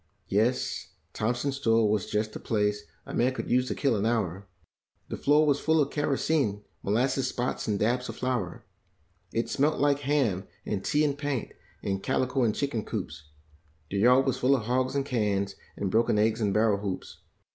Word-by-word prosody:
Yes, 110 +6 0 0.2
Thompson's 125 +5 -1
store 115 -4 +3
was 105 -2 0
just 110 +1 -1
the - - -6
place 105 -3 0 0.2
a - - -8
man 125 +2 +2
could - - -4
use 125 +1 +3
to - - -2
kill 140 -5 +1
an 100 - -1
hour; 100 -5 -1 0.6
Hie - - -1
floor 150 +2 +4
was 145 -1 +2
full 160 0 +2
of 145 -1 +1
kerosene, 140 -7 0 0.2
molasses 130 +5 +1
spots 125 -1 -2
and 105 -2 +1
dabs 120 +4 0
of - - -5
flour; 125 -8 -2 0.7
It 115 - -1
smelt 150 +3 +1
like 145 0 +3
ham 130 -10 0 0.2
and 100 -2 -2
tea 150 0 +2
and 140 -2 0
paint, 145 -4 -3 0.3
and 95 -1 -1
calico 130 +2 0
and 110 -3 +2
chicken 130 -6 -1
coops; 75 -9 -5 0.7
The 100 - 0
yard 125 +5 +5
was 135 - 0
full 135 +2 +4
of 120 - -2
hogs 130 +3 0
and 140 -1 0
cans 105 -7 0 0.2
and 100 -2 -2
broken 115 0 +3
eggs 110 +2 +2
anl 105 -2 +2
barrel 105 -1 +3
hoops. 100 -2 -5
120 Hz, 185 wpm, -28 LUFS, 105-135 Hz, 0.7 s, yard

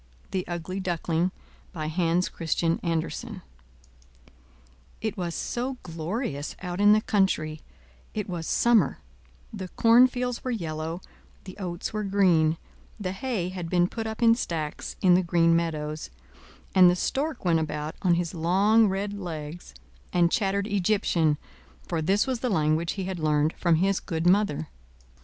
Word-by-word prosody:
THE 185 -1 -1
UGLY 175 +2 -4
DUCKLING 175 -1 0 0.4
By 155 -4 -4
Hans 170 +2 +1
Christian 165 0 -1
Andersen 165 -1 -3 1.6
It 220 -1 -3
was 175 -4 -3
so 255 +2 -3
glorious 165 - -4
out 180 +1 -3
in 205 0 +7
the 215 - +4
country; 160 -8 0 0.5
it 210 -2 -2
was 170 -4 -4
summer; 235 -2 +3 0.6
the 190 -3 -5
cornfields 245 +4 +3
were 255 - -3
yellow, 165 -5 -3 0.4
the 185 - -10
oats 175 0 -4
were 215 0 -2
green, 180 -5 +3 0.4
the 185 -3 -2
hay 195 -3 -2
had 180 -3 -5
been 175 0 +3
put 225 +3 -5
up 220 +2 -4
in 230 0 +7
stacks 165 -10 -4
in 180 -2 +6
the 180 - +5
green 170 -1 +3
meadows, 155 -2 -2 0.6
and 185 -1 +8
the 175 - +3
stork 275 - -2
went 165 -2 +3
about 150 0 -3
on 180 -3 +3
his 170 -1 -2
long 195 +7 +4
red 200 +1 -2
legs, 165 - -7 0.4
and 175 -1 +3
chattered 200 -1 +1
Egyptian, 190 -6 +1 0.5
for 160 - -1
this 195 +6 +2
was 260 -3 -2
the 250 - -1
language 160 -3 +1
he 195 - -4
had 185 -1 -4
learned 155 0 +2
from 170 -2 +2
his 190 +4 +2
good 165 -2 -3
mother. 175 -5 +2
180 Hz, 150 wpm, -26 LUFS, 165-205 Hz, 1.6 s, and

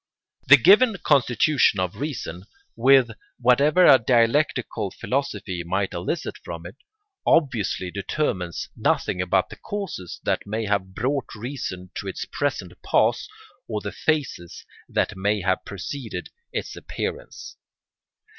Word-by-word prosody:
] - - -40
The 145 - +11
given 205 - +6
constitution 135 -4 +3
of 90 -1 -2
reason, 110 - -5 0.3
with 130 0 +5 0.3
whatever 140 +8 +4
a 130 - +8
dialectical 120 -1 +1
philosophy 105 -9 -3
might 95 +3 -1
elicit 85 0 -3
from 85 0 -7
it, 90 - -9 0.5
obviously 115 - +1
determines 95 - -2
nothing 90 - 0
about 90 +1 +1
the - - -9
causes 190 - -6
that - - -1
may 110 +2 -2
have 95 -2 -1
brought 135 +1 -2
reason 110 -6 -6
to 100 - -5
its 95 - -4
present 145 0 -3
pass - - +2 0.4
or - - -2
the - - -5
phases 140 - -2 0.2
that - - 0
may 100 +2 0
have 95 0 0
preceded 110 +5 -6 0.2
its - - -4
appearance. - - -6
115 Hz, 125 wpm, -24 LUFS, 95-140 Hz, 0.5 s, The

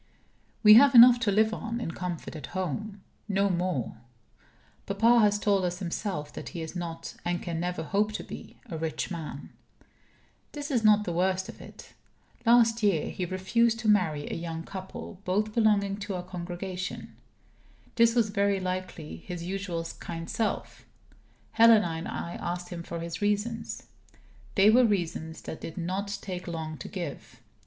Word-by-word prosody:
We 210 -1 +10
have 270 +4 +7
enough 240 +1 +10
to 225 -3 +1
live 220 +2 +3
on 230 +2 -4
in 230 - -3
comfort 175 -2 -5
at 150 -4 -7
home 195 +3 -4 0.2
no 200 -1 +2
more. 175 -10 -2 0.9
Papa 225 +4 +4
has 205 -2 +4
told 200 -2 +2
us 180 0 -1
himself 180 -4 -4
that - - -7
he 165 - -3
is 160 - -7
not 165 -2 -5
(and 175 0 -1
can 170 -3 -4
never 175 -1 -2
hope 205 +5 +1
to - - -4
be) - - -10
a 170 -9 -6
rich 160 +2 -3
man. 160 -4 -6 1.0
This 290 0 -5
is 240 -4 +1
not 210 -1 +6
the 175 - -3
worst 190 +3 0
of - - -10
it. - - -13 0.5
Last 230 -1 +5
year, 200 -7 +1
he 185 - -3
refused 225 +6 +1
to 225 - -2
marry 160 -8 +2
a - - -4
young 165 -1 -5
couple, 190 +1 -8
both 210 +3 0
belonging 205 -3 +2
to 200 -1 -4
our 180 - -4
congregation. 180 +1 -6 0.8
This 230 0 +4
was 225 -4 +2
very 200 -1 +2
unlike 185 0 -2
his 170 +2 -8
usual 180 -2 -3
kind 165 -1 -6
self. 225 - -3 0.7
Helena 225 -5 +6
and 165 0 -4
I 170 - -5
asked 175 +1 -4
him 175 -1 -6
for 170 0 -6
his 170 +2 -5
reasons. 210 +3 -1 0.7
They 200 +1 +6
were 250 +3 +6
reasons 170 -6 -1
that 160 - -7
did 165 - -7
not 195 +3 -2
take 180 -2 -5
long 160 -2 -5
to - - -7
give. 155 - -7
190 Hz, 165 wpm, -28 LUFS, 170-210 Hz, 1.0 s, We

